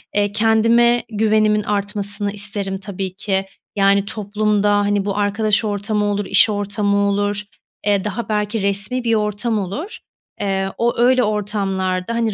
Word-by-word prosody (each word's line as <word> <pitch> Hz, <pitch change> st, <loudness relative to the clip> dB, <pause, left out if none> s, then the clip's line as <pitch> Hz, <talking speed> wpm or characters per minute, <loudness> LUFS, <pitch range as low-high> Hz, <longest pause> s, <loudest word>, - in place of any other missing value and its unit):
eee, 205 Hz, 0 st, +1 dB
kendime 230 Hz, +2 st, +3 dB
güvenimin 215 Hz, -1 st, +2 dB
artmasını 205 Hz, 0 st, -1 dB
isterim 200 Hz, -1 st, -3 dB
tabii 190 Hz, -1 st, -5 dB
ki. 195 Hz, -1 st, -1 dB, 0.3 s
Yani, 200 Hz, 0 st, +3 dB
toplumda, 210 Hz, 0 st, 0 dB
hani, 205 Hz, -1 st, +1 dB
bu 200 Hz, 0 st, -2 dB
arkadaş 210 Hz, +2 st, +1 dB
ortamı 210 Hz, 0 st, -1 dB
olur, 205 Hz, 0 st, -1 dB
iş 215 Hz, -, +5 dB
ortamı 205 Hz, 0 st, 0 dB
olur, 205 Hz, 0 st, 0 dB, 0.4 s
eee, 200 Hz, -2 st, +2 dB
daha 210 Hz, +2 st, -4 dB
belki 210 Hz, 0 st, -1 dB
resmi 200 Hz, +6 st, -1 dB
bir 230 Hz, -1 st, +2 dB
ortam 210 Hz, +1 st, -1 dB
olur. 205 Hz, -, -5 dB, 0.4 s
Eee, 195 Hz, -1 st, -1 dB
o, 240 Hz, +1 st, 0 dB
öyle, 250 Hz, +1 st, +4 dB
ortamlarda, 195 Hz, -2 st, -1 dB
hani, 230 Hz, -2 st, 0 dB
205 Hz, 140 wpm, -19 LUFS, 200-215 Hz, 0.4 s, iş